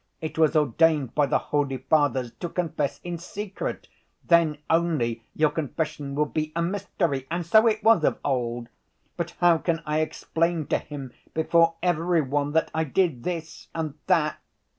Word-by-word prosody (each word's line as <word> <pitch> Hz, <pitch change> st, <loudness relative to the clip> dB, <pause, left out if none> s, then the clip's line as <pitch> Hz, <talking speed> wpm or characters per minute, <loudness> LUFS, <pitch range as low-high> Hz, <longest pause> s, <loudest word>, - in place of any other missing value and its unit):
It 160 Hz, 0 st, -5 dB
was 160 Hz, 0 st, +4 dB
ordained 150 Hz, -2 st, +3 dB
by 145 Hz, -2 st, +2 dB
the -, -, +2 dB
holy 140 Hz, -2 st, -1 dB
Fathers 135 Hz, -5 st, +1 dB
to 175 Hz, -, -3 dB
confess 155 Hz, -5 st, -2 dB
in 175 Hz, -1 st, -4 dB
secret: 200 Hz, +3 st, -5 dB, 0.4 s
then 165 Hz, -3 st, +4 dB
only 140 Hz, -9 st, +1 dB
your 155 Hz, -1 st, +3 dB
confession 150 Hz, -2 st, -3 dB
will 150 Hz, +1 st, +2 dB
be 155 Hz, +1 st, -3 dB
a 170 Hz, -, 0 dB
mystery, 170 Hz, -7 st, -2 dB
and 170 Hz, +1 st, -2 dB
so 220 Hz, +7 st, +5 dB
it 215 Hz, -1 st, +1 dB
was 220 Hz, -7 st, +5 dB
of -, -, +2 dB
old. 120 Hz, -3 st, -1 dB, 0.5 s
But 170 Hz, -1 st, -4 dB
how 175 Hz, -2 st, +5 dB
can 165 Hz, -1 st, -1 dB
I 150 Hz, +1 st, 0 dB
explain 165 Hz, +1 st, -1 dB
to -, -, +2 dB
him 140 Hz, -4 st, -8 dB, 0.2 s
before 165 Hz, +1 st, +3 dB
every 175 Hz, -1 st, +2 dB
one 145 Hz, +1 st, -1 dB
that 160 Hz, -, +1 dB
I 160 Hz, -, +1 dB
did 155 Hz, -3 st, 0 dB
this 165 Hz, -3 st, -5 dB
and 160 Hz, -3 st, -2 dB
that 165 Hz, -5 st, +2 dB
160 Hz, 165 wpm, -25 LUFS, 145-170 Hz, 0.5 s, so